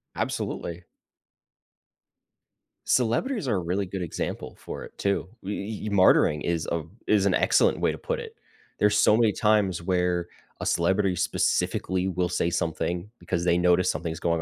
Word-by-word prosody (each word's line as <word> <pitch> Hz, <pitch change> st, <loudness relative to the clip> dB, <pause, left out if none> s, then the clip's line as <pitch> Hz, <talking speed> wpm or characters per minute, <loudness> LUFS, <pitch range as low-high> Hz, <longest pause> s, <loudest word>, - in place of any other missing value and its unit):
Absolutely. 85 Hz, +1 st, -3 dB, 2.0 s
Celebrities 135 Hz, -, +1 dB
are 115 Hz, -, +1 dB
a -, -, 0 dB
really 90 Hz, +3 st, -1 dB
good 95 Hz, 0 st, -5 dB
example 85 Hz, -, -4 dB
for -, -, -7 dB
it -, -, -13 dB
too. 100 Hz, -2 st, 0 dB
We 100 Hz, +2 st, -4 dB
e 105 Hz, +1 st, -5 dB
e -, -, -2 dB
martyring 95 Hz, -6 st, +4 dB
is 85 Hz, -2 st, -1 dB
a 85 Hz, -2 st, -1 dB, 0.2 s
is 105 Hz, -2 st, +3 dB
an 100 Hz, -, +3 dB
excellent -, -, +3 dB
way -, -, +1 dB
to -, -, -7 dB
put -, -, -3 dB
it. 455 Hz, -1 st, -9 dB, 0.4 s
There's 105 Hz, 0 st, +3 dB
so 105 Hz, -, +5 dB
many 115 Hz, -2 st, +3 dB
times 105 Hz, -6 st, +2 dB
where 90 Hz, -1 st, 0 dB, 0.3 s
a -, -, -4 dB
celebrity 95 Hz, +2 st, +2 dB
specifically 95 Hz, +2 st, 0 dB
will 90 Hz, 0 st, 0 dB
say 85 Hz, -1 st, 0 dB
something 85 Hz, +3 st, -2 dB
because 85 Hz, -1 st, -2 dB
they 85 Hz, 0 st, +3 dB
notice 90 Hz, 0 st, +3 dB
something's 80 Hz, +1 st, -3 dB
going 85 Hz, -1 st, 0 dB
90 Hz, 160 wpm, -26 LUFS, 85-105 Hz, 2.0 s, so